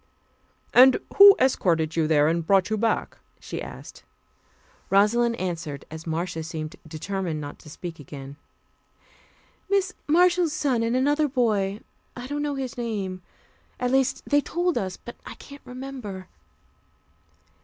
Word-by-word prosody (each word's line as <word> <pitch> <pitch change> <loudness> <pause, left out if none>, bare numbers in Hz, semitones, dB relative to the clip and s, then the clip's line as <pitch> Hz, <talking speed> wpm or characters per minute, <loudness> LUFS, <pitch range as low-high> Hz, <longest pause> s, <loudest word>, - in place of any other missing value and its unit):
"And 260 +1 +8 0.2
who 400 0 +10
escorted 165 -11 +1
you 160 -2 +1
there, 150 -1 +4
and 165 +1 0
brought 195 +3 +2
you - - +2
back?" 225 +1 -1 0.2
she - - -6
asked. - - -10 0.9
Rosalind 230 +4 +3
answered, 165 -8 -4
as 160 +1 -8
Marcia 165 +1 -2
seemed 160 +1 -6
determined 170 +1 -4
not 145 -1 -8
to 155 - -14
speak 165 +2 -8
again. 140 -1 -9 1.3
"Mrs. 390 -2 +1
Marshall's 345 0 +3
son 260 -7 0
and 230 +1 0
another 290 +4 +2
boy; 215 -6 0 0.3
I 245 - -7
don't 290 +2 -3
know 290 -1 -2
his 260 -3 -5
name. 200 -6 -3 0.6
At 250 0 0
least, 265 -1 +1
they 290 0 +3
told 350 +3 -1
us, 190 -5 -2
but 240 - -11
I - - -9
can't 280 0 -13
remember." 250 -8 -7
215 Hz, 140 wpm, -25 LUFS, 165-270 Hz, 1.3 s, who